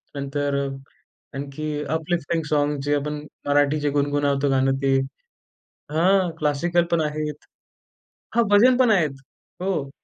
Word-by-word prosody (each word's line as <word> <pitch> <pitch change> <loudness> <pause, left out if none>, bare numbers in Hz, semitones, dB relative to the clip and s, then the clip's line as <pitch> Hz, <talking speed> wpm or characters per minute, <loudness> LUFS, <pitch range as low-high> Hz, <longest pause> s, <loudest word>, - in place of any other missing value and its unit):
नंतर 140 0 -2
अ, - - -3 0.7
आणखी 140 +2 -5 0.2
uplifting 160 0 -1
songs 145 -1 0
जे 145 0 +2
आपण 150 +1 -3 0.2
मराठीचे 145 +1 +2
गुणगुणावतो 145 0 +1
गाणं 135 0 +2
ते 135 -1 +3 0.9
हां, 180 +4 +3
क्लासिकल 170 +4 +1
पण 170 -1 +3
आहेत. 150 -1 -3 0.9
हां, 235 - +5
भजन 240 +5 +6
पण 250 -3 +4
आहेत. 165 -8 +3 0.5
हो. 180 -7 -1
150 Hz, 120 wpm, -23 LUFS, 145-170 Hz, 0.9 s, भजन